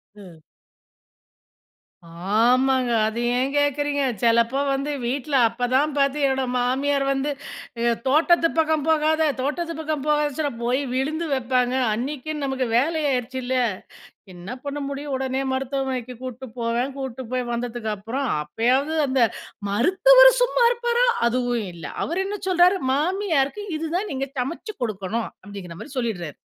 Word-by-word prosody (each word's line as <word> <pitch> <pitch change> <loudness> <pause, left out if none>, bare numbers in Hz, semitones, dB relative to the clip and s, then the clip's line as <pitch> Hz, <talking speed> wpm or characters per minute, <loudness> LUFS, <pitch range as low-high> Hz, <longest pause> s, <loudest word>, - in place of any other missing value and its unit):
ம். 180 -6 -14 2.0
ஆமாங்க, 255 +2 +3 0.2
அத 220 +1 -4 0.2
ஏன் 260 +2 0
கேட்கிறீங்க, 290 0 +1 0.2
செலப்போ 235 +3 +3
வந்து 275 +2 -1
வீட்ல 270 +3 -2
அப்பதான் 255 +5 +1
பார்த்தீங்கன்னா, 275 -1 +1
என் 250 - -3
மாமியார் 275 +3 +1
வந்து, 275 +2 -1 0.8
தோட்டத்துப் 330 +4 +3
பக்கம் 315 -2 +2
போகாத, 315 0 +3
தோட்டத்துப் 330 +4 -3
பக்கம் 310 -3 -3
போகாதன்னுறப்போ, 295 -3 0
போய் 255 +3 +1
விழுந்து 305 +6 -1
வைப்பாங்க, 250 -1 +1 0.2
அன்னைக்குன்னு 285 +5 -4
நமக்கு 265 -1 -1
வேலை 315 +5 +1
ஆயிருச்சுல்ல? 255 0 -2 0.8
என்ன 175 +4 -9
பண்ண 285 +1 -3
முடியும்? 280 0 -5
உடனே 265 0 -1
மருத்துவமனைக்குக் 260 -2 -3
கூட்டுப் 255 -1 -8
போவேன், 235 +3 -1
கூட்டுப் 260 -3 -6
போய் 255 0 0
வந்ததுக்கப்புறம், 235 +1 -3 0.2
அப்பயாவது 250 - +1
அந்த 260 -1 +1 0.5
மருத்துவர் - - +6
சும்மா - - +3
இருப்பாரா? 480 0 +1 0.2
அதுவும் 240 -3 -1
இல்ல, 165 -2 -10 0.2
அவரு 350 +5 -1
என்ன 415 +1 -3
சொல்றாரு, 365 +1 +4 0.2
மாமியாருக்கு 330 +1 0
இதுதான் 340 +6 -2
நீங்க 270 +1 -2
சமச்சு 335 - -4
குடுக்கணும் 215 +1 -3 0.2
அப்டிங்கிற 190 -5 -9
மாரி 290 - -10
சொல்லிடுறாரு. 185 - -3
265 Hz, 120 wpm, -23 LUFS, 245-300 Hz, 2.0 s, மருத்துவர்